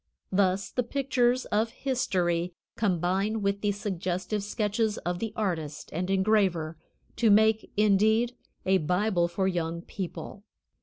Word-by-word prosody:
Thus 190 0 +1
the 250 - 0
pictures 255 -1 +1
of 220 +2 +2
history 180 -10 0 0.2
combine 195 +2 0
with 200 0 0
the 205 - +2
suggestive 190 0 -2
sketches 210 +1 0
of 175 0 -3
the 225 -2 -3
artist 160 -8 -3
and 180 +3 -2
engraver, 190 -5 +2 0.4
to 230 - +4
make, 220 +1 +4
indeed, 215 +4 +3 0.3
a 190 0 +4
Bible 180 +2 +1
for 190 +2 -1
Young 170 -2 -2
People. 195 +1 -6
200 Hz, 130 wpm, -28 LUFS, 180-220 Hz, 0.4 s, to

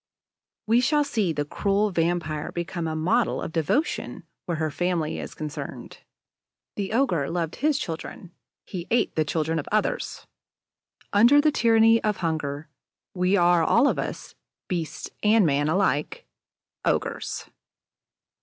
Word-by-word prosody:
We 230 +3 +4
shall 295 +3 +3
see 220 -11 0
the 145 -2 -2
cruel 200 +6 0
vampire 165 -3 -1
become 170 -1 -4
a 160 - -3
model 185 +10 +1
of - - -5
devotion 165 - -1 0.2
where 170 -2 -1
her 155 -1 -1
family 175 -1 -1
is - - -7
concerned. 155 -1 -7 0.8
The 200 -1 -3
ogre 200 - +1
loved 165 -1 -2
his 295 0 +2
children; 170 - -6 0.3
he 180 -3 -6
ate 240 - +1
the 155 - +2
children 160 +1 -1
of 145 - -6
others. 215 0 -1 0.9
Under 240 +8 +6
the 305 +1 +4
tyranny 225 -3 +4
of 210 -2 0
hunger, 160 -3 -3 0.5
we 180 +2 +2
are 175 -1 +4
all 235 - +4
of - - 0
us, - - -5 0.3
beasts 170 -4 -4
and 215 -1 +4
men 145 0 +1
alike, 155 -5 0 0.6
ogres. - - -2
175 Hz, 135 wpm, -25 LUFS, 160-220 Hz, 0.9 s, Under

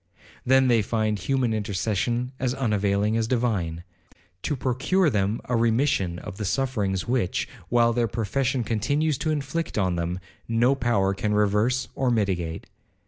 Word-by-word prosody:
Then 130 +1 +4
they 120 -3 +4
find 110 0 -1
human 125 +4 0
intercession 110 +4 -1
as 130 -1 0
unavailing 105 -4 +1
as 115 -1 +1
divine, 100 -10 -1 0.6
to 145 - -1
procure 135 +7 +1
them 105 0 0
a 125 - -1
remission 115 -6 +1
of 95 +1 -8
the 105 - -4
sufferings 105 -4 -1
which, 120 -7 0 0.2
while 120 -1 +3
their 120 0 +1
profession 120 +4 -1
continues 140 +7 0
to 160 - -1
inflict 155 +1 -2
on 95 -4 +1
them, 85 +1 -2 0.3
no 120 +3 +3
power 120 -7 +1
can 105 +1 -1
reverse 105 +5 +2
or 130 -2 0
mitigate. 95 -8 -1
115 Hz, 145 wpm, -25 LUFS, 100-130 Hz, 0.6 s, Then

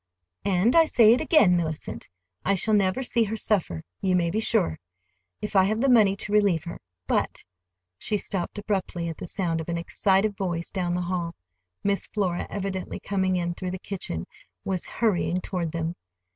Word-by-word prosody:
"And 200 - +3
I 330 -1 +7
say 230 -7 +6
it 250 - +1
again, 305 - +5
Mellicent. 160 -3 -3 0.3
I 200 - +2
shall 215 +4 +1
never 200 +5 +2
see 235 -2 +2
her 220 +2 -3
suffer, 175 - 0 0.2
you 185 -1 +2
may 170 -2 +1
be 215 - 0
sure,—if 90 - -2
I 190 - +7
have 215 +3 0
the 270 +3 +2
money 210 -5 +5
to 200 - -6
relieve 200 -6 +3
her. 170 0 -7 0.3
But—" - - -1 0.6
She 210 - -1
stopped 190 -1 -3
abruptly 190 -4 -2
at 165 - -6
the - - -7
sound 165 -3 -1
of 160 - -8
an 170 - -1
excited 195 +4 +1
voice 175 -3 -3
down 175 -3 -1
the 180 - -1
hall. 175 -1 -2 0.5
Miss 200 0 0
Flora, 185 -5 -1
evidently 190 -2 -4
coming 190 -2 0
in 175 -1 -1
through 185 +1 -5
the 185 - -4
kitchen, 180 - -4 0.4
was 185 -2 -1
hurrying 185 -5 0
toward 180 -3 -3
them. 165 0 -2
185 Hz, 180 wpm, -26 LUFS, 170-205 Hz, 0.6 s, I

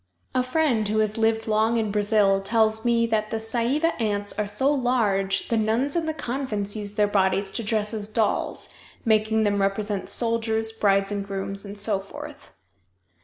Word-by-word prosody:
A 255 - +2
friend 255 -5 +1
who 215 +1 -1
has 215 0 0
lived 225 0 +1
long 220 +2 +2
in 220 -2 -1
Brazil 205 -1 +2
tells 220 +1 +1
me 235 -1 +2
that 215 -2 -1
the 225 - -2
Saiiva 240 +8 0
ants 205 -2 -1
are 210 - -2
so 265 +8 +2
large 210 -7 0
the 230 - +1
nuns 225 +7 +1
in 335 -2 0
the 315 - -1
convents 235 -7 -3
use 205 -1 -3
their 210 - +3
bodies 195 -1 +1
to 230 - -3
dress 215 0 -1
as 210 -1 -4
dolls, 220 -1 0 0.3
making 220 0 +2
them 205 -1 +1
represent 200 0 -1
soldiers, 225 -1 +1
brides 200 -2 +1
and 200 -1 -2
grooms, 195 0 -4
and 200 +1 -9
so 205 -1 +1
forth. 195 - -10
215 Hz, 175 wpm, -24 LUFS, 205-230 Hz, 0.3 s, their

